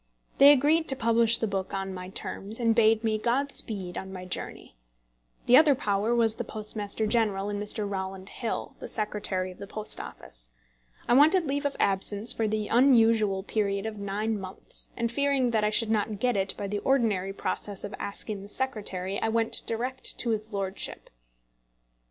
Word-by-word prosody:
They 280 +1 +10
agreed 300 +4 +3
to 270 - +4
publish 230 -1 +4
the - - -1
book 195 -2 -3
on 195 0 -3
my 180 0 -7
terms, 200 +3 -1
and 230 -1 +3
bade 220 -1 +4
me 215 -1 0
God 265 +5 0
speed 190 -5 -4
on 190 - -8
my 185 -1 -7
journey. 180 - -6 0.7
The 250 - +7
other 300 -2 +6
power 210 +1 0
was 225 -2 +3
the 240 - -2
Postmaster 215 -1 -3
General 210 -3 0
and 205 0 -3
Mr. 210 0 -3
Rowland 190 0 -5
Hill, 235 - -4
the - - -7
Secretary 205 -3 -2
of 180 - -15
the 200 - -7
Post 215 +1 -1
Office. - - -8 0.6
I - - +3
wanted 315 +7 +5
leave 285 +1 0
of 285 - -7
absence 200 +3 +2
for 225 - 0
the 215 0 -1
unusual 225 -6 +4
period 200 -1 -1
of 220 -2 -5
nine 205 +2 -2
months, 190 -1 -6
and 235 -1 -1
fearing 275 -1 +1
that 220 -2 +1
I 210 - +3
should 220 +1 +2
not 215 -1 0
get 245 +3 +1
it 195 -1 0
by 205 - -4
the 205 +1 -2
ordinary 215 -7 +1
process 200 0 -4
of 205 - -6
asking 200 0 -5
the 200 - -10
Secretary, 200 -7 -3
I 225 - +1
went 225 0 0
direct 250 +3 -3
to 235 - 0
his 220 0 -3
lordship. 195 -1 -5
215 Hz, 185 wpm, -27 LUFS, 195-235 Hz, 0.7 s, They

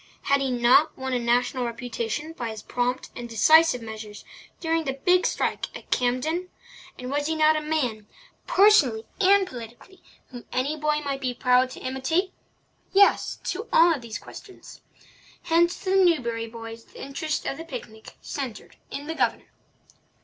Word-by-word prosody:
Had 280 0 +2
he 270 - 0
not 250 +5 +4
won 265 0 -3
a 250 - +1
national 245 +2 +1
reputation 240 +4 -4
by 240 -7 -4
his 220 -1 -8
prompt 245 +1 -2
and 240 0 -7
decisive 310 +2 +5
measures 215 -1 -9 0.3
during 325 -1 0
the 270 - -1
big 360 +7 +3
strike - - -1
at - - -17
Campden? 305 +9 0 0.5
And 250 +1 -6
was 290 +1 0
he 320 - -1
not 310 0 +4
a 310 - -1
man, 255 -9 -2 0.4
personally 300 - +4
and 395 0 +5
politically, 245 - -11 0.3
whom 245 -2 -10
any 270 +4 -1
boy 300 0 0
might 275 -2 -3
be 250 -2 -2
proud 250 +1 +3
to - - -10
imitate? 320 +9 -1 0.6
Yes, 400 0 +4
to 435 +6 -4
all 335 +1 +6
of 285 - -5
these 230 -2 -6
questions. 380 - -13 0.6
Hence 345 +1 +2
to 375 - -1
the 385 0 +5
Newbury 235 -10 +1
boys 225 0 -9
the - - -11
interest 300 +3 -3
of 275 - -3
the 325 - -7
picnic 235 -8 -9
centred 260 -7 -6
in 285 - -6
the 320 - -4
Governor. - - -1
270 Hz, 165 wpm, -25 LUFS, 240-320 Hz, 0.6 s, all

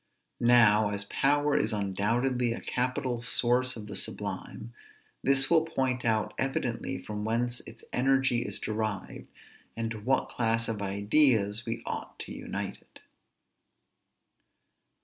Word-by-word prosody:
Now, 115 -3 +5
as 100 0 -2
power 145 +1 +2
is 110 - +1
undoubtedly 115 +5 0
a - - -5
capital 125 -1 -2
source 125 +1 +2
of 110 -3 -8
the 105 - -7
sublime, 115 +2 -5 0.5
this 135 0 +4
will 165 0 +4
point 130 -6 -1
out 110 -2 +1
evidently 135 -1 -2
from 105 -1 -6
whence 120 +2 0
its 115 - -12
energy 130 -1 +2
is 120 - -3
derived, 110 -2 -4 0.5
and 115 -1 -2
to 110 - -5
what 130 +5 +1
class 115 -1 0
of 110 -3 -3
ideas 105 +1 +3
we 115 - -3
ought - - -5
to - - -8
unite - - -5
it. - - -19
120 Hz, 130 wpm, -29 LUFS, 110-130 Hz, 0.5 s, Now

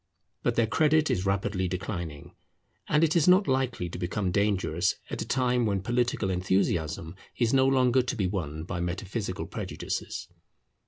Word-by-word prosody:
But - - 0
their 115 - +3
credit 155 +7 +3
is 95 +1 0
rapidly 95 -1 0
declining; 85 -5 -5 0.5
and 150 +1 +3
it 165 0 +3
is 165 -2 +4
not 185 +2 +6
likely 130 -8 0
to 85 - -7
become 90 +1 -1
dangerous 95 -3 +1 0.2
at - - -3
a - - -4
time 125 -2 +2
when 100 -2 -1
political 120 -3 0
enthusiasm 90 -2 0 0.2
is 120 -1 +2
no 135 0 +5
longer 130 -1 +4
to 125 +2 -3
be 105 -5 0
won 80 -5 -3
by 90 +1 -4
metaphysical 95 +3 -3
prejudices. - - -5
100 Hz, 160 wpm, -28 LUFS, 90-125 Hz, 0.5 s, not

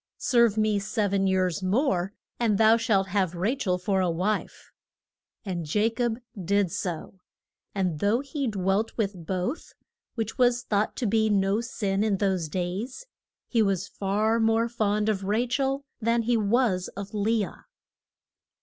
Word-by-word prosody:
Serve 235 -4 +3
me 215 -1 +2
sev 205 0 -1
en 195 -1 +2
years 185 -3 +1
more, 190 -2 +1 0.3
and 225 -4 +2
thou 220 +1 +6
shalt 200 -4 +1
have 185 -3 0
Ra 190 +8 +1
chel 185 -9 0
for 190 +1 0
a 180 - +1
wife. 185 +6 -2 0.7
And 175 -6 -4
Ja 210 +2 +4
cob 240 -2 0 0.3
did 200 0 +1
so, 175 +2 -4 0.6
and 180 -6 -1
though 210 - +2
he 280 -1 -3
dwelt 195 +1 0
with 205 -3 0
both 190 - -3 0.4
which 225 +1 -4
was 245 -1 +3
thought 210 -2 0
to 250 - -2
be 220 +1 +2
no 200 +1 +2
sin 205 -4 -1
in 210 -3 +1
those 190 -5 0
days 190 - -4 0.4
he 230 - +2
was 195 -2 +1
far 210 +3 0
more 225 +1 +3
fond 210 -2 0
of 200 -3 0
Ra 215 +5 +1
chel 270 +2 -1 0.2
than 230 +1 +2
he 240 +1 +2
was 210 -3 +1
of 200 +1 -6
Le 215 0 +1
ah. - - -15
205 Hz, 160 wpm, -26 LUFS, 190-230 Hz, 0.7 s, thou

